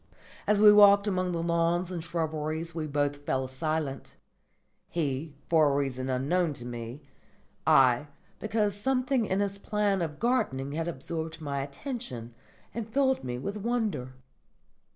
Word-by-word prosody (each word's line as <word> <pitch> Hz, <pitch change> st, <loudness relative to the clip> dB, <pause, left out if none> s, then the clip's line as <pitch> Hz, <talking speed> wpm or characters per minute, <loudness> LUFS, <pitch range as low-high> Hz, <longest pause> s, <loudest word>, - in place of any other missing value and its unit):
As 210 Hz, -1 st, +4 dB
we 210 Hz, 0 st, +9 dB
walked 200 Hz, -1 st, +7 dB
among 185 Hz, -3 st, 0 dB
the 165 Hz, -1 st, -2 dB
lawns 170 Hz, +1 st, +1 dB
and 170 Hz, -3 st, -4 dB
shrubberies 160 Hz, 0 st, -2 dB
we 155 Hz, -2 st, -3 dB
both 145 Hz, 0 st, 0 dB
fell 130 Hz, -2 st, -2 dB
silent: 140 Hz, +1 st, -3 dB, 0.7 s
he, 150 Hz, -2 st, -2 dB
for 155 Hz, -3 st, +4 dB
a -, -, 0 dB
reason 135 Hz, -2 st, -1 dB
unknown 150 Hz, +6 st, +1 dB
to 120 Hz, -3 st, -9 dB
me; 120 Hz, +3 st, -7 dB, 0.6 s
I, 130 Hz, +2 st, +5 dB, 0.3 s
because 210 Hz, -1 st, 0 dB
something 255 Hz, +1 st, +1 dB
in 190 Hz, +2 st, +1 dB
his 200 Hz, 0 st, -2 dB
plan 205 Hz, -2 st, 0 dB
of 155 Hz, -3 st, -3 dB
gardening 140 Hz, -, 0 dB
had 165 Hz, +3 st, -2 dB
absorbed 160 Hz, +1 st, -5 dB
my 140 Hz, -3 st, -3 dB
attention 140 Hz, -, -6 dB, 0.4 s
and 230 Hz, -2 st, -5 dB
filled 265 Hz, +1 st, +2 dB
me 125 Hz, -1 st, -3 dB
with 200 Hz, +11 st, -4 dB
wonder. 210 Hz, -, -2 dB
165 Hz, 145 wpm, -29 LUFS, 140-200 Hz, 0.7 s, we